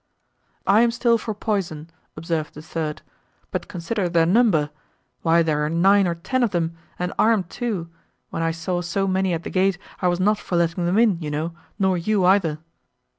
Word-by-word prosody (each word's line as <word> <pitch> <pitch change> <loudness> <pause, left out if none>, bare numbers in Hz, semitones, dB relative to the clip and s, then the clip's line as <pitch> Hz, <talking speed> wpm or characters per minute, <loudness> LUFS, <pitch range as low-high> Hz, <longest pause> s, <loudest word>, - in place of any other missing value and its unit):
"I 205 +3 +5
am 235 - +4
still 235 0 +2
for 220 -1 -4
poison," 185 -8 -2 0.3
observed 155 -1 -3
the 150 - -9
third, 155 -1 -4 0.5
"but - - -3
consider 180 +2 -2
their 170 -1 +3
number; 175 -7 +3 0.5
why 165 0 +4
there 150 -2 0
are 150 - 0
nine 190 +4 +4
or 170 - -1
ten 260 +10 -1
of 240 - +3
them, 170 -3 -1 0.2
and 180 +1 -2
armed 215 -6 +3
too; 215 -9 -3 0.4
when - - -3
I 165 - +1
saw 165 +2 -2
so 185 +3 -1
many 190 0 +1
at 165 -1 -2
the - - -6
gate, 190 0 +2 0.2
I 180 - +2
was 175 0 +1
not 205 +3 +2
for 180 - -4
letting 170 +1 +1
them 180 +4 +1
in, 220 -7 +4
you 150 - -3
know, 155 +3 -2 0.2
nor 190 -3 +2
you 195 +1 +1
either." 180 -5 +3
180 Hz, 195 wpm, -23 LUFS, 165-200 Hz, 0.5 s, I